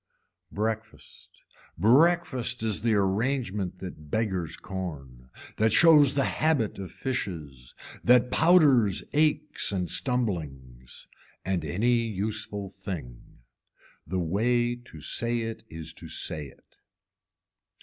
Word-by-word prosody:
Breakfast, 110 +1 -5 0.5
breakfast 130 - +2
is 110 -2 +1
the 115 -1 +2
arrangement 100 -1 -1
that 75 -5 -9
beggars 95 -4 -2
corn, 70 -10 -7 0.3
that 110 +1 +3
shows 150 +1 +6
the 140 - +2
habit 150 -11 0
of 95 -2 -7
fishes, 80 - -5 0.3
that 125 0 +4
powders 135 - +4
aches 150 -3 +2
and 90 -3 -2
stumblings, 70 - -2 0.4
and 95 -1 -1
any 120 +7 +1
useful 105 -2 -3
thing. 80 - -9 0.7
The 95 +4 -2
way 120 +8 +1
to 120 -11 -14
say 120 +9 0
it 115 0 -5
is 80 -1 -6
to - - -11
say 75 -2 -1
it. - - -22
105 Hz, 110 wpm, -27 LUFS, 90-125 Hz, 0.7 s, shows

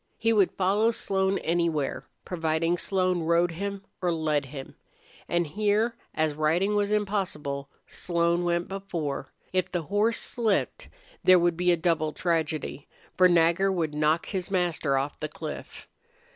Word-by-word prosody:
He 225 0 +2
would 200 -4 +4
follow 200 +4 +2
Slone 195 -3 0
anywhere, 165 -4 -1 0.2
providing 165 -1 0
Slone 185 -2 +1
rode 170 +1 +2
him 200 +3 -4 0.2
or 180 -1 +1
led 155 -3 0
him. 135 0 -8 0.6
And 175 0 +1
here, 210 +7 +1 0.2
as 155 -1 +1
riding 165 +7 +1
was 205 0 +1
impossible, 180 -10 -2 0.2
Slone 170 0 0
went 175 0 0
before. 170 -9 -4 0.2
If 185 0 0
the 175 -2 -1
horse 210 +6 +1
slipped 225 -5 -1 0.4
there 185 0 +7
would 175 -1 +2
be 180 +1 +2
a 175 - +3
double 160 -2 0
tragedy, 160 -4 -2 0.3
for 185 0 +6
Nagger 175 +3 +3
would 165 -5 -1
knock 155 +2 +1
his 185 -3 -4
master 175 -7 +1
off 135 +2 -3
the 155 - -3
cliff. 155 0 -8
175 Hz, 145 wpm, -27 LUFS, 155-195 Hz, 0.6 s, there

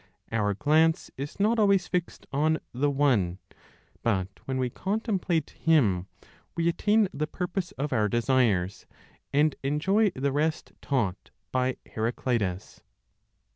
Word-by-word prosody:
Our 105 -3 +1
glance 160 - +2
is 140 +6 -6
not 220 +3 +3
always 200 -3 +4
fixed 180 -1 -3
on 155 +3 +2 0.2
the 140 +4 +1
One; 125 -11 +2 0.6
but 95 -5 0 0.2
when 130 -1 -2
we 125 -1 -1
contemplate 190 - -1
Him, 110 - +2 0.5
we 170 0 +1
attain 210 +5 +3
the 150 +2 -2
purpose 180 +2 -3
of 145 0 -3
our 105 -3 +2
desires, 115 -6 +1 0.4
and 150 +1 +3
enjoy 190 +10 +2
the 140 +1 0
rest 155 +3 -1
taught 105 -9 -1 0.2
by 130 0 0
Heraclitus. 110 -4 -2
140 Hz, 125 wpm, -27 LUFS, 115-170 Hz, 0.6 s, always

